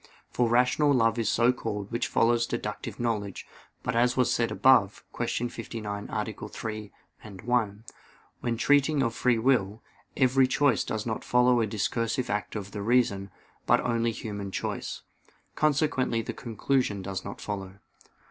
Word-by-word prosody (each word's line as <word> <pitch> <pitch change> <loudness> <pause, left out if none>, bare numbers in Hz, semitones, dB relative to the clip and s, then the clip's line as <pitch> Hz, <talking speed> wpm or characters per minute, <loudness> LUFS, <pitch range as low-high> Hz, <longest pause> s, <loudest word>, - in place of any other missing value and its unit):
For 120 -2 +1
rational 125 +5 +3
love 115 -1 +2
is 115 - +1
so 120 +2 +3
called 105 -4 -5
which 120 +1 -1
follows 120 +1 +2
deductive 105 0 -5
knowledge: 105 -5 -2 0.4
but, 125 - -2
as 120 +2 +2
was 125 - +3
said 115 -1 +1
above 115 -7 +4
(Q. 120 - -1
59, 105 -3 -6
A. 105 0 -1 0.2
3, 105 -2 -6 0.3
ad 100 -4 -10
1), 110 -4 0 0.6
when 120 -1 -2
treating 145 +2 +3
of 115 -2 0
free 125 0 +2
will, 110 -4 +1 0.3
every 130 0 +4
choice 145 +2 +2
does 110 -1 -3
not 110 -2 -3
follow 125 -1 +3
a 110 - +1
discursive 115 +3 -1
act 105 +2 -3
of 105 -1 -5
the 105 - -5
reason; 110 -3 +1 0.4
but - - +5
only 115 -1 0
human 105 -3 -5
choice. - - -4 0.5
Consequently 135 -6 +1
the - - -5
conclusion 115 -3 -1
does 95 0 -4
not 100 - -7
follow. 95 -2 -5
115 Hz, 155 wpm, -28 LUFS, 105-125 Hz, 0.6 s, but